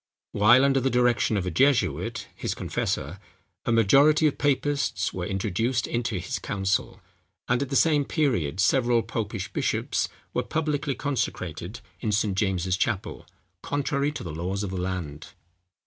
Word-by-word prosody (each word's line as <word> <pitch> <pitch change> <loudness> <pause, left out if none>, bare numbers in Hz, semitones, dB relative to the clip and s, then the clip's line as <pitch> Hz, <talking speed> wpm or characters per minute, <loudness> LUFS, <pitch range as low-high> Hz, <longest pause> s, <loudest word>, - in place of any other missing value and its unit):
While 120 +6 +5
under 135 -1 +3
the 135 +1 +1
direction 120 -3 +2
of 95 - -1
a 90 - -2
jesuit, 135 - +1
his - - -3
confessor, - - -3 0.5
a - - +2
majority 140 +8 +5
of 150 - +1
papists 140 -8 0
were 90 -1 -3
introduced 110 +5 -1
into 120 -3 -2
his 90 - -4
council; 95 0 -1 0.5
and 125 +1 +1
at 140 - -2
the 135 - -2
same 150 -1 +3
period 105 - 0
several 120 +2 +3
popish 110 -3 -4
bishops - - -1 0.2
were - - +1
publicly 150 -3 -1
consecrated 105 - -3 0.2
in 110 - -1
St. 100 -1 +1
James's 95 -2 0
Chapel, 100 -2 -2 0.3
contrary 145 0 -1
to - - -6
the 85 - -6
laws 95 +5 -3
of 100 - -4
the 95 -1 -3
land. 90 -6 -5
115 Hz, 150 wpm, -26 LUFS, 95-135 Hz, 0.5 s, While